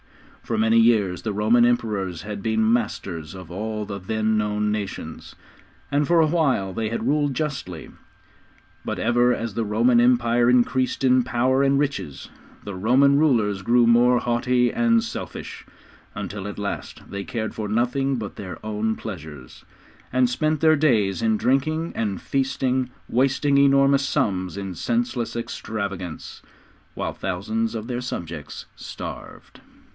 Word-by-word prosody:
For 115 - -3
many 110 +1 +4
years 105 -6 +3
the 110 - -3
Roman 110 +4 +3
Emperors 105 -8 0
had 105 -1 -6
been 110 0 +2
masters 95 -7 -3
of 90 -3 -10
all 105 +3 -4
the 100 -1 -6
then 110 +3 0
known 105 0 0
nations, 100 -6 -5 0.6
and 145 +1 +2
for 170 -1 +4
awhile 150 - +2
they 110 0 -2
had 115 - -3
ruled 145 -2 +1
justly; 125 - -4 0.9
but - - -3
ever 120 +1 +3
as 115 -3 -4
the 115 - -1
Roman 115 +3 +3
Empire 120 -1 +3
increased 125 +2 +2
in 130 -1 +4
power 130 +4 +1
and 140 0 +3
riches, 140 - -3 0.3
the 100 - -6
Roman 130 +8 +4
rulers 110 -10 +2
grew 120 +4 +4
more 120 +1 +5
haughty 125 +1 +1
and 230 -1 +3
selfish, 230 - -7 0.5
until 100 -1 -5
at 105 - -7
last 100 0 -5
they 100 0 -5
cared 110 +1 -4
for 105 -2 -4
nothing 125 +5 +1
but 105 -3 -6
their 95 -3 -7
own 110 +1 -1
pleasures, 80 - -9 0.5
and 130 0 +3
spent 155 +5 0
their 160 -1 +5
days 110 - +2
in 110 -1 +2
drinking 155 +7 0
and 105 -4 -2
feasting, 130 -2 -1 0.2
wasting 135 +3 +2
enormous 140 0 +4
sums 95 - -1
in 95 -2 -5
senseless 120 +4 -2
extravagance, 100 -7 -5 0.5
while - - -3
thousands 110 +5 -2
of 110 0 -5
their 125 -1 -3
subjects 85 - -6
starved. - - -9
115 Hz, 145 wpm, -23 LUFS, 100-130 Hz, 0.9 s, more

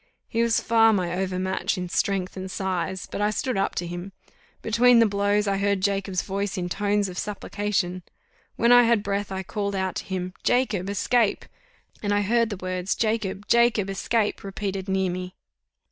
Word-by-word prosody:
He 230 - -1
was 235 -1 +3
far 225 -1 +4
my 180 -3 0
overmatch 190 0 -1
in 180 0 -3
strength 185 +1 -1
and 190 0 -6
size; 185 -1 -2
but - - -5
I 210 - +3
stood 240 +4 -2
up 195 - 0
to 175 - -2
him. 175 +3 -6 0.5
Between 235 +2 +5
the 230 - +6
blows, 205 0 +1
I 195 0 +1
heard 200 0 +1
Jacob's 195 -1 0
voice 200 0 -3
in 180 -1 -2
tones 205 +1 0
of 185 -1 -6
supplication. 205 -3 -2 0.5
When 235 +1 +3
I 245 0 +9
had 230 -3 +3
breath 200 0 -2
I 190 0 -3
called 200 +1 -3
out 190 -1 -1
to - - -5
him, 185 -1 -4
"Jacob! 215 -7 +1
Escape!" 215 +2 +1 0.6
And 205 -1 0
I 205 - +2
heard 230 +2 +2
the 205 - -4
words, 185 0 -2
"Jacob! 215 -3 -1
Jacob! 235 -4 +3
Escape!" 210 +3 -1
repeated 195 -1 -4
near 190 -1 +1
me. 180 +1 -6
200 Hz, 180 wpm, -25 LUFS, 185-215 Hz, 0.6 s, I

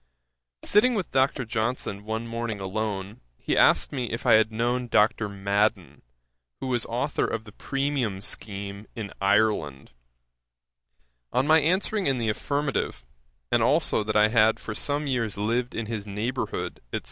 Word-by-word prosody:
'Sitting 235 +4 +4
with 195 -4 -2
Dr. 130 -1 +2
Johnson 110 -2 -2
one 110 +2 -3
morning 115 -2 -4
alone, 100 0 -4 0.2
he - - -1
asked - - +4
me 130 -4 -2
if 115 +3 -5
I 120 - +6
had 110 0 +5
known 120 +2 0
Dr. 105 -1 +2
Madden, 100 +2 0 0.6
who - - -5
was 125 -3 0
authour 125 +5 -1
of 110 - -3
the 105 - -13
premium 135 -6 -2
scheme 100 0 -5
in 105 -4 -6
Ireland. 100 -9 +1 1.4
On 130 - +2
my 160 +2 +6
answering 185 +5 +1
in 135 -2 +1
the 115 -2 -1
affirmative, 140 - -2 0.5
and - - +3
also 110 - +2
that 110 0 0
I 105 0 +5
had 110 -1 +4
for 110 - -6
some 145 +6 -1
years 115 -7 -1
lived 120 +4 -1
in 115 - -2
his 105 -2 -5
neighbourhood, 110 +6 -3
&c. - - -1
115 Hz, 155 wpm, -26 LUFS, 105-130 Hz, 1.4 s, I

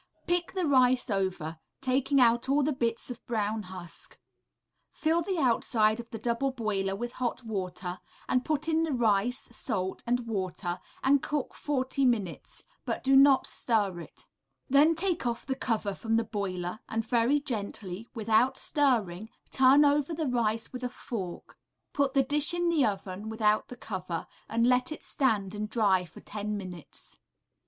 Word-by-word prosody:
Pick 350 0 0
the 370 -2 0
rice 255 -3 +3
over, 180 -5 -2 0.2
taking 270 +2 +1
out 235 +1 +4
all 285 +1 +3
the 300 +2 +1
bits 235 -1 -2
of 245 - -9
brown 220 -2 -1
husk; 180 -3 -8 0.7
fill 325 +2 +1
the 370 +2 -2
outside 230 -5 +2
of 235 -1 -8
the 225 - -6
double 235 +4 0
boiler 205 -6 -1
with 240 +4 -4
hot 250 0 -3
water, 185 -4 -4 0.3
and 255 0 +1
put 310 0 -1
in 325 0 +2
the 325 -3 0
rice, 235 0 +1
salt, 190 -6 -2
and 245 +1 +2
water, 185 -4 -3 0.2
and 275 0 +4
cook 295 -3 -2
forty 275 -1 0
minutes, 220 -9 -1 0.2
but - - -3
do 270 0 +4
not 275 0 +6
stir 205 -7 0
it. 170 - -11 0.4
Then 290 +4 +5
take 345 -5 -1
off 235 -1 -3
the 270 - -1
cover 220 -6 -1
from 225 +3 -1
the 230 - +2
boiler, 195 -3 -4
and 225 0 -1
very 240 +5 +2
gently, 210 -6 -4
without 225 +4 +2
stirring, 220 -9 +1 0.2
turn 270 +3 +6
over 290 +2 +2
the 315 0 -2
rice 230 -2 0
with 250 0 -6
a 250 - -1
fork; 215 -8 -7 0.3
put 280 -1 +1
the 270 - +5
dish 295 +5 +2
in 345 0 +1
the 320 -4 +3
oven 200 -1 -2
without 215 -1 +1
the 250 - -10
cover, 185 -6 -4 0.2
and 230 +1 +2
let 250 +2 +3
it 310 - -7
stand 215 -8 0
and 210 0 -4
dry 200 -5 +2
for - - -14
ten 210 0 -4
minutes. 180 -5 -9
235 Hz, 165 wpm, -29 LUFS, 205-270 Hz, 0.7 s, not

